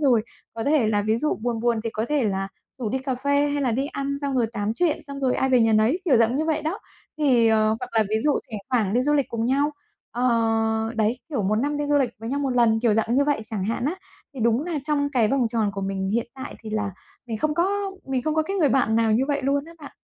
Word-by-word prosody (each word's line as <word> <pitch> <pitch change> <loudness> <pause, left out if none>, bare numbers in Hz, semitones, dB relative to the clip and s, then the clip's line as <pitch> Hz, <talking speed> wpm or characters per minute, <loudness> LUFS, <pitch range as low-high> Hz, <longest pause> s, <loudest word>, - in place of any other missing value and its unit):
rồi 250 -7 +3 0.3
có 225 - -4
thể 285 -6 +3
là 205 -1 +1
ví 215 +2 +1
dụ 300 +5 0
buồn 235 -2 -1
buồn 235 -2 +1
thì 225 - -1
có 220 +1 -2
thể 295 -5 +1
là 195 -1 -1 0.3
rủ 235 - -2
đi 265 +5 -1
cà 265 0 -2
phê 285 +3 +1
hay 285 0 -1
là 255 - +1
đi 270 +4 0
ăn 280 0 -3
xong 280 -2 -2
rồi 235 -2 +2
tám 210 -1 -1
chuyện 335 -1 +1
xong 280 -1 -8
rồi 260 -2 +1
ai 265 - +1
về 255 -2 +4
nhà 225 -1 +3
nấy, 220 - +3
kiểu 275 -8 +4
dạng 230 +2 +3
như 305 - 0
vậy 315 -1 0
đó. 325 +7 -2 0.4
Thì 245 -6 +4
ờ, 215 -1 +3
hoặc - - -5
là 225 - +4
ví 215 - +2
dụ 300 - +4 0.2
thỉnh 215 - -4
thoảng 220 -6 +1
đi 245 - +3
du 295 +3 +1
lịch 280 -2 +2
cùng 230 -1 -2
nhau, 280 +4 +2 0.4
ờ, 245 +2 -3 0.7
đấy, 220 +3 +1
kiểu 270 -10 -2
một 205 +3 +1
năm 285 +6 0
đi 290 0 -2
du 290 0 +2
lịch 255 -4 +1
với 225 - -5
nhau 280 +2 -1
một 275 - 0
lần, 235 -3 +3
kiểu 230 -3 +3
dạng 225 +2 +1
như 280 +2 +4
vậy 290 -6 +1
chẳng 215 -4 -3
hạn 230 +4 -2
á. 305 - 0 0.4
Thì 255 - -7
đúng 235 +5 +2
là 330 -3 -2
trong 290 -2 +1
cái 230 -5 +3
vòng 260 -2 +2
tròn 220 -3 0
của 195 - -5
mình 195 0 -2
hiện 235 +1 0
tại 260 -1 -7
thì 220 - -7
là 210 -2 -1 0.4
mình 225 -2 -3
không 300 +5 0
có 340 - +2 0.4
mình 260 -2 -1
không 310 +1 -1
có 315 - +2
cái 390 +5 -3
người 310 -6 +3
bạn 245 -5 +2
nào 225 -1 +3
như 240 +4 +3
vậy 285 -1 0
luôn 280 +1 +1
á 335 - -12
bạn. 285 - -10
250 Hz, 285 wpm, -24 LUFS, 220-285 Hz, 0.7 s, về